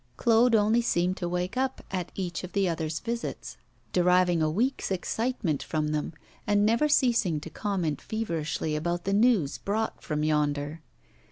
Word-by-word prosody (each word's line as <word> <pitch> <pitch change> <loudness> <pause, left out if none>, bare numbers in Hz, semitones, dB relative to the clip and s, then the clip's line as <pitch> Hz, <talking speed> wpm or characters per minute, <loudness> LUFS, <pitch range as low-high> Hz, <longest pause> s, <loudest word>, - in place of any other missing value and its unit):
Claude 230 0 +4
only 220 +2 +3
seemed 180 -5 +1
to 175 -2 -3
wake 180 +4 -2
up 260 0 -2
at 180 -2 -3
each 180 -2 -3
of 180 - -8
the 195 -2 +2
other's 160 -2 -2
visits; 235 +1 -5 0.4
deriving 180 -1 +3
a 155 - +2
week's 240 - 0
excitement 195 - -1
from 155 -1 -2
them, 150 -1 -2 0.4
and 205 0 +3
never 230 +7 +3
ceasing 235 - +3
to 160 +2 -9
comment 180 -8 -2
feverishly 160 -8 -2
about 175 +3 -2
the 195 - -1
news 205 - +3
brought 220 +2 -2
from 150 -1 -2
yonder. 150 0 0
180 Hz, 160 wpm, -27 LUFS, 155-225 Hz, 0.4 s, Claude